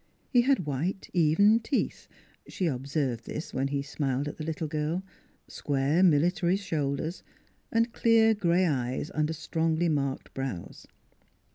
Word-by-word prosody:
He 245 - +5
had 260 - +2
white, 155 +7 -3
even 180 +7 +4
teeth 260 +5 -2 0.4
she 185 - -3
observed 135 -4 -2
this 155 - -6
when 135 +1 0
he 140 0 -2
smiled 140 -1 -2
at 145 - -6
the 155 - -5
little 160 0 -3
girl 155 +4 -2 0.4
square 145 +4 0
military 175 +1 +3
shoulders, 160 -3 -2 0.5
and 230 0 +1
clear 225 -1 +4
gray 185 -3 +2
eyes 130 -2 -1
under 155 +1 0
strongly 165 +2 0
marked 140 -3 -2
brows. 135 -10 -6
155 Hz, 135 wpm, -28 LUFS, 140-185 Hz, 0.5 s, He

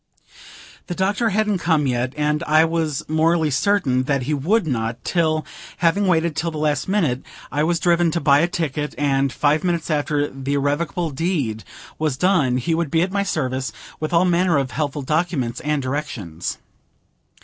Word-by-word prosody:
The 175 - -4
Doctor 200 +5 +1
hadn't 210 -1 +1
come 160 -4 +2
yet; 125 0 -1
and 150 +1 +1
I 155 +1 +5
was 160 -3 -2
morally 160 0 +2
certain 135 -4 +1
that 140 -2 0
he 150 - -1
would 170 +9 +1
not, 115 -5 -2
till, 155 -3 +1 0.3
having 190 +4 +2
waited 170 -3 +2
till 170 +2 -1
the 155 - -6
last 150 -2 0
minute, 160 -11 +1 0.3
I 145 +1 0
was 170 +1 +1
driven 175 -1 +3
to 170 - -1
buy 140 -3 +4
a 170 - +3
ticket, 150 -4 -3
and, 140 -2 +1
five 150 +4 +1
minutes 170 -2 -1
after 145 -1 0
the 135 +1 -3
irrevocable 150 +4 -1
deed 140 - -2 0.4
was 155 -4 0
done, 150 -7 +2
he 130 +7 -1
would 165 -2 0
be 165 +3 +2
at 185 - -2
my 200 0 0
service, 130 - -2 0.3
with 155 - -3
all 170 +1 +4
manner 175 -2 +3
of 135 -2 -1
helpful 145 -2 -2
documents 150 -5 -1
and 150 -2 -1
directions. 120 - -4
155 Hz, 175 wpm, -21 LUFS, 140-170 Hz, 0.4 s, I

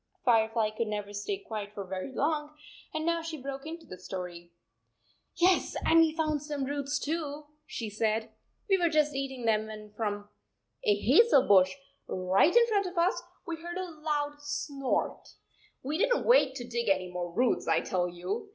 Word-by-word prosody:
Firefly 225 -2 +3
could 220 +1 -2
never 205 -1 -4
stay 205 - -2
quiet 215 - -6
for 200 - -4
very 185 +6 -5
long 300 +2 -1 0.3
and 310 0 -3
now 335 0 +1
she 325 -1 -5
broke 275 +2 -6
into 330 +1 -7
the 185 - -10
story. 180 -2 -7 0.8
"Yes, 365 +1 +3
and 330 - +6
we 325 -1 +5
found 310 -2 0
some 295 -2 -3
roots, 285 +1 -2
too," 300 -1 -3 0.2
she 230 -6 -4
said. 220 +1 -1 0.2
" - - -45
We 385 -2 +3
were 345 -1 +3
just 305 -2 +2
eating 265 -3 -4
them 215 -1 +2
when 215 -1 -9
from 205 -1 -3 0.6
a 205 - +4
hazel 275 - +5
bush 185 -2 +5 0.3
right 190 - +3
in 475 0 +7
front 410 -4 +1
of 360 0 -8
us 355 +6 +2 0.2
we 335 -1 -4
heard 345 +2 -6
a 370 -2 -4
loud 290 -1 -1
snort! 285 -2 -2 0.5
We 300 +5 -2
did - - +3
n - - -1
t - - -6
wait 290 - +5
to 245 -3 -6
dig 235 -2 -1
any 185 -2 +1
more 175 -1 -4
roots, 240 +7 +1
I - - +3
tell 180 -1 -1
you 405 - -4
275 Hz, 190 wpm, -30 LUFS, 210-320 Hz, 0.8 s, in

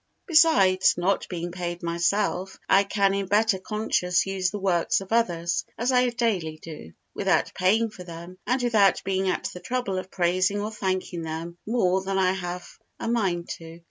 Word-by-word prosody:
Besides, 240 - +5
not 185 +3 0
being 175 -1 -4
paid 175 0 -5
myself, 185 +3 0
I 195 +1 +5
can 195 -1 +1
in 200 -1 -2
better 210 0 +2
conscience 185 -3 0
use 190 -1 -1
the 210 - -5
works 185 -4 +1
of 195 +1 -10
others, 170 -7 +1
as 240 +3 0
I 250 -1 +3
daily 210 -10 -1
do, 150 - -10 0.2
without - - +1
paying 215 +5 +2
for 185 -3 -10
them 170 +1 -10
and 250 +1 +1
without 210 -6 +3
being 190 0 0
at - - -2
the 180 - -8
trouble 200 -1 -2
of 185 - -8
praising 185 +3 +1
or 210 +1 -3
thanking 185 -4 -2
them 165 +2 -6
more 190 -5 +2
than 195 0 -2
I 185 -1 +3
have 180 -1 -5 0.3
a - - -4
mind 190 -7 0
to. 165 0 -11
190 Hz, 175 wpm, -25 LUFS, 175-210 Hz, 0.3 s, Besides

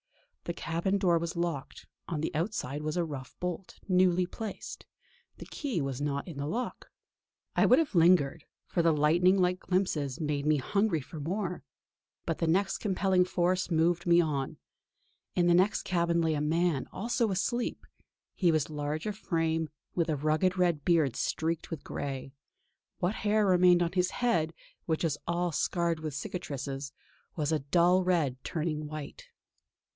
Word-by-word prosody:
The 170 - -2
cabin 170 +4 -1
door 175 -3 +3
was 170 +1 -4
locked; 170 -5 -3 0.2
on 165 - -2
the 160 - -2
outside 155 - -2
was 155 +2 -2
a 175 - +1
rough 140 -5 -7
bolt, 180 +1 -5
newly 180 -1 +3
placed; 215 +3 -7 0.5
the - - -9
key 275 - -3
was 135 -2 -3
not 140 +1 -2
in 165 -5 -8
the 140 +1 -3
lock. 240 +9 -4 0.7
I - - +4
would - - +6
have 320 -7 +1
lingered, 165 -4 +4 0.2
for 175 - 0
the 165 0 +4
lightning 165 +5 +4
like 180 0 +2
glimpse 165 -7 -1
made 150 -2 -1
me 155 -1 +4
hungry 200 +3 +1
for 155 +4 -9
more; 180 +2 -3 0.6
but 165 - -2
the 165 - +1
same 190 +5 +3 0.2
compelling 190 -2 +2
force 180 +1 0
moved 175 +1 +1
me 170 0 +6
on. 145 -5 -1 0.8
In 175 - +3
the 175 - +5
next 185 +4 +3
cabin 170 -2 +1
lay 160 -1 +2
a 150 - -1
man, 160 -1 +1
also 230 +2 0
asleep. 235 +6 -1 0.5
He 175 -3 +3
was 155 -1 0
large 150 +1 -3
of 210 -1 -2
frame, 165 -5 -1 0.2
with 170 -1 0
a 155 - +1
rugged 155 +6 +1
red 170 -5 +2
beard 155 -8 +3
streaked 165 +4 -2
with 160 -4 -6
grey; 135 -1 -5 0.6
what 180 +3 0
hair 215 0 +1
remained 180 -2 +5
on 170 - -1
his 180 -1 +2
head, 170 -10 +1 0.4
which 160 0 0
was 150 -3 0
all 175 +1 0
scarred 170 +1 0
with 155 -3 -5
cicatrices, 140 -3 -5 0.4
was 150 -2 -1
a 155 - +2
dull 175 +6 +3
red 155 -8 0
turning 155 -2 -2
white. 155 - -8
170 Hz, 165 wpm, -30 LUFS, 150-180 Hz, 0.8 s, would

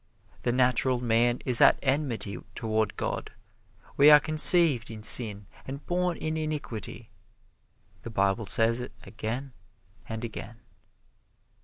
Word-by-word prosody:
The 120 - -2
natural 125 0 0
man 120 0 0
is 125 -3 +1
at - - +5
enmity 130 -7 -3 0.2
toward 110 -1 -3
God. - - -5 0.7
We 145 +2 +6
are 150 0 +7
conceived 155 -4 +6
in 110 -2 -10
sin 105 -3 +2 0.2
and 140 +2 -9
born 180 -1 -2
in 155 0 -5
iniquity. 150 -8 -7 0.9
The - - -9
Bible 100 0 -2
says 115 +4 +2
it 125 - -9
again 120 +4 -7 0.6
and 110 +1 -6
again. 115 +1 -10
120 Hz, 125 wpm, -26 LUFS, 110-140 Hz, 0.9 s, are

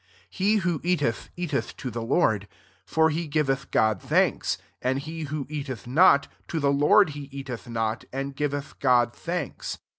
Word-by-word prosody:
J 190 - -5
He 210 +2 +5
who 175 -7 0
eateth, 155 -10 0
eateth 145 -9 -2
to 130 - -5
ikt 115 0 -5
Lord; 110 - +2 0.4
for 160 +5 +3
he 165 +2 -2
giveth 140 -2 0
God 110 -4 +2
thanks - - +1 0.2
and 130 +1 +1
he 160 +3 -5
who 145 -1 -4
eateth 140 -5 -5
not, 140 +2 +5 0.2
to 165 - -2
the 140 -1 +2
Lord 155 +6 +5
he 145 -1 -8
eateth 130 -3 -7
not, 115 0 -2
and 135 +1 -4
^veth 145 0 -3
God 120 -3 +3
thanks. 170 -4 -4
140 Hz, 170 wpm, -26 LUFS, 125-160 Hz, 0.4 s, He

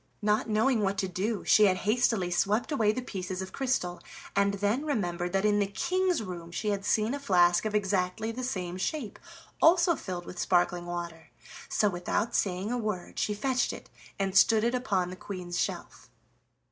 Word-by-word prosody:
Not 210 +1 +1
knowing 220 +2 +2
what 200 0 0
to 195 -2 0
do, 195 +4 -2
she 215 - +6
had 185 -2 +3
hastily 215 -4 +2
swept 205 - +1
away 220 -8 +3
the 250 +3 -4
pieces 185 -5 -5
of 190 0 -6
crystal, 245 -10 -1 0.3
and 200 0 +2
then 205 +7 0
remembered 180 - -2
that 195 +1 +1
in 205 -1 +3
the 200 - +1
King's 360 - 0
room 175 -4 -7
she 210 +5 -2
had 200 -1 -1
seen 215 +3 +1
a 285 - -3
flask 175 -7 +3
of 215 -1 -1
exactly 195 +1 0
the 255 +3 -5
same 185 -8 -3
shape, 230 - -3 0.4
also 340 0 +5
filled 180 -8 -6
with 175 - -8
sparkling 175 -1 +1
water. 170 -2 -6 0.4
So, 210 - +2
without 185 +4 -1
saying 190 +2 0
a 245 - -1
word, 210 -5 -4
she 210 - 0
fetched 255 +4 0
it - - -11 0.3
and 195 -1 -2
stood 220 +2 +5
it 235 +1 +1
upon 200 -8 0
the - - -6
Queen's 180 -2 -5
shelf. - - -4
200 Hz, 185 wpm, -29 LUFS, 180-225 Hz, 0.4 s, she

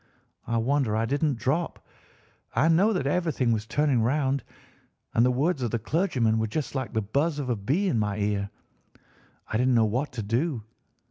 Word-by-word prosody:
I 115 +1 0
wonder 125 -1 +1
I 110 +1 +1
didn't 140 +1 0
drop. 150 +9 -2 0.7
I 160 - +4
know 185 +7 +4
that 180 -10 -1
everything 145 -5 +1
was 110 -1 -1
turning 135 +1 +2
round, 135 +2 +1 0.7
and 115 - +4
the 125 - +4
words 140 +4 +1
of 120 - 0
the 115 - 0
clergyman 115 - +1
were 110 - 0
just 145 +7 -3
like 130 -3 -3
the 110 -2 0
buzz 145 +9 0
of 135 -4 -2
a - - +1
bee 140 - 0
in 125 -11 +1
my 105 -1 -1
ear. 100 -1 -1 1.0
I 110 - -2
didn't 125 +1 +3
know 115 -1 +5
what 125 +7 -1
to 115 -3 -4
do. 120 +3 -1
125 Hz, 190 wpm, -26 LUFS, 110-150 Hz, 1.0 s, know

